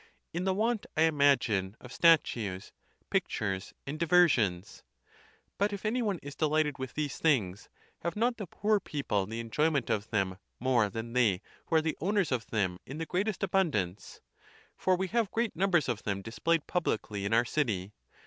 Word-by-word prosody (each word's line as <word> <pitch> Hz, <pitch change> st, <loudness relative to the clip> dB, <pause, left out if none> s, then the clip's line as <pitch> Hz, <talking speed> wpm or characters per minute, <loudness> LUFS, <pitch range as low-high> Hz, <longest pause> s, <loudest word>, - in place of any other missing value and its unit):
In 175 Hz, +2 st, -2 dB
the 190 Hz, -, +2 dB
want, 220 Hz, +1 st, 0 dB
I 160 Hz, -, +5 dB
imagine, 130 Hz, -10 st, +2 dB
of 125 Hz, -, -11 dB
statues, 120 Hz, -, +2 dB, 0.4 s
pictures, 95 Hz, -2 st, -1 dB
and 150 Hz, +3 st, -5 dB
diversions. 130 Hz, -, +3 dB, 0.8 s
But 205 Hz, +1 st, +2 dB
if 200 Hz, +1 st, -6 dB
any 240 Hz, +4 st, +1 dB
one 205 Hz, -5 st, 0 dB
is 140 Hz, 0 st, -7 dB
delighted 155 Hz, -2 st, +1 dB
with 130 Hz, -1 st, -5 dB
these 150 Hz, -2 st, -2 dB
things, 105 Hz, -, +1 dB, 0.3 s
have 170 Hz, -, -3 dB
not 235 Hz, +3 st, +1 dB
the 205 Hz, -4 st, -6 dB
poor 210 Hz, +5 st, +1 dB
peo 145 Hz, -6 st, -5 dB
ple 100 Hz, -5 st, 0 dB
the 115 Hz, +2 st, -5 dB
enjoyment 140 Hz, +4 st, 0 dB
of 105 Hz, +1 st, -1 dB
them 95 Hz, -3 st, -1 dB, 0.2 s
more 120 Hz, -4 st, +2 dB
than 115 Hz, +3 st, -6 dB
they 110 Hz, -6 st, +2 dB, 0.2 s
who 165 Hz, -, 0 dB
are 160 Hz, -, +6 dB
the 160 Hz, -, -1 dB
owners 195 Hz, -1 st, +1 dB
of 120 Hz, -3 st, -1 dB
them 95 Hz, -5 st, -1 dB
in 135 Hz, -, -8 dB
the 165 Hz, -, -3 dB
greatest 195 Hz, +4 st, -1 dB
abundance? 110 Hz, -, -1 dB, 0.5 s
For 185 Hz, -, +2 dB
we 190 Hz, +1 st, -1 dB
have 230 Hz, -1 st, +1 dB
great 230 Hz, +1 st, -1 dB
numbers 175 Hz, -4 st, +2 dB
of 120 Hz, -5 st, -2 dB
them 100 Hz, -1 st, -3 dB
displayed 150 Hz, +9 st, 0 dB
publicly 105 Hz, -, -2 dB
in 100 Hz, -, -2 dB
our 115 Hz, +2 st, +4 dB
city. 105 Hz, -9 st, -1 dB
145 Hz, 175 wpm, -30 LUFS, 105-180 Hz, 0.8 s, are